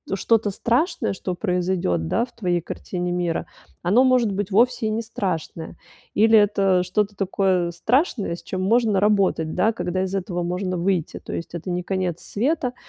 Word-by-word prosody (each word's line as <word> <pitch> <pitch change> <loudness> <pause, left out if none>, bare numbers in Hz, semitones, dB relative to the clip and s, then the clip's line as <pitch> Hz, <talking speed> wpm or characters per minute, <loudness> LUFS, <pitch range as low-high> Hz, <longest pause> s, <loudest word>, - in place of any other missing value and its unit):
что-то 220 +1 +2
страшное, 245 - 0
что 185 -1 -4
произойдет, 180 - -1
да, 235 - +1
в 245 - -23
твоей 180 -5 0
картине 180 +1 -4
мира, 175 -2 -1 0.4
оно, 205 +9 +4
может 250 -4 +3
быть, 205 0 -3
вовсе 235 +2 +3
и - - 0
не 220 +1 -1
страшное, 180 -7 -4 0.4
или 220 +1 +6
это 195 -3 +3
что-то 205 +3 -1
такое 190 -2 +1
страшное, 220 - 0
с 170 - -13
чем 185 +2 -4
можно 220 -1 +3
работать, 195 -6 +2
да, 205 +5 +3
когда 180 0 -2
из 190 0 -4
этого 180 -2 -2
можно 180 +1 -2
выйти, 175 -2 -1
то - - -10
есть 170 +1 -5
это 175 +2 -5
не 180 0 -2
конец 185 -3 -2
света, 250 +2 -1
190 Hz, 170 wpm, -23 LUFS, 175-220 Hz, 0.4 s, или